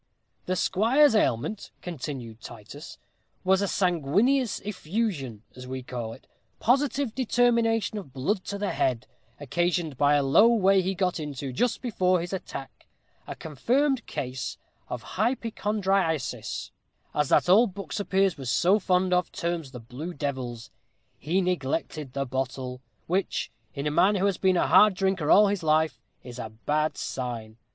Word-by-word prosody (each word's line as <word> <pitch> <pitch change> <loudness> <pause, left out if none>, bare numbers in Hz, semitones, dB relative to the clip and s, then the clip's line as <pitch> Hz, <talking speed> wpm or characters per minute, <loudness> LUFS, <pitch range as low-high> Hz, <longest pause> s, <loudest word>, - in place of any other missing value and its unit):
"The 185 - 0
squire's 230 +10 +4
ailment," 205 - 0
continued 135 -9 -6
Titus, 120 +7 -10 0.5
"was 190 +1 +3
a 200 - +1
sanguineous 195 - +1
effusion, 175 - -3
as 125 0 -9
we 130 0 -5
call 120 -3 -5
it 130 - -15 0.3
positive 270 0 +1
determination 235 -3 +2
of 150 -9 -11
blood 180 +10 -1
to 200 - -4
the 205 0 -1
head, 125 -2 0 0.3
occasioned 165 0 -1
by 145 0 +4
a 145 - +3
low 140 +12 +6
way 195 -4 +4
he 190 +1 -2
got 180 -2 0
into, 140 -3 -5
just 245 - 0
before 185 -6 +2
his 175 +3 -5
attack 155 -7 -7 0.4
a - - -5
confirmed 245 - 0
case 130 -1 -4 0.3
of - - -5 0.2
hypochondriasis, 205 - -1 0.4
as 150 -2 0
that - - +4
ould 195 +1 +5
book 185 -8 -7
Sir 205 - -1
Piers 190 -5 +1
was 130 -3 -4
so 185 +9 +3
fond 185 -1 +1
of 180 -2 +1
terms 170 -4 -3
the 125 -2 -9
blue 135 +10 -7
devils. 125 -4 -4 0.5
He 175 +7 +1
neglected 155 -5 -2
the 140 0 -1
bottle, 130 0 -4 0.2
which, 185 +3 -1 0.2
in 140 0 -4
a 150 - +1
man 195 +7 +4
who 195 0 +1
has 200 -3 +1
been 185 -1 +3
a - - +3
hard 210 -2 +6
drinker 190 -5 0
all 210 - +7
his 200 -2 -1
life, 155 0 +1 0.2
is 125 0 -9
a 110 - -5
bad 150 +8 -1
sign. 115 -4 -5
175 Hz, 155 wpm, -27 LUFS, 135-200 Hz, 0.5 s, all